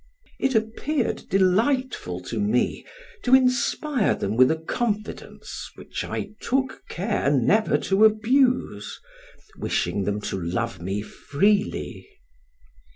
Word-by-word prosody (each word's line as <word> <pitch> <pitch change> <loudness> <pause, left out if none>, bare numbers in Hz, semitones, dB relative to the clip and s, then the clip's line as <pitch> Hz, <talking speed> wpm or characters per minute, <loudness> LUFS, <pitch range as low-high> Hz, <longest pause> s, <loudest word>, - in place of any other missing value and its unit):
It 265 -2 +1
appeared 230 +5 -1
delightful 195 - +1
to 110 +5 -5
me, 105 +4 +1 0.4
to 255 +1 +5
inspire 255 0 +2
them 100 +2 -2
with 130 +2 +6
a 160 - +2
confidence 210 +6 -4
which - - -6
I - - -4
took 265 +1 -1
care 195 -4 -1
never 145 - +3
to 195 +3 +4
abuse, 225 - +2 0.6
wishing 100 -2 -1
them 105 +1 -1
to 95 - -3
love 95 +3 -3
me 95 +4 -3
freely. 200 - -1
205 Hz, 110 wpm, -24 LUFS, -, 0.6 s, with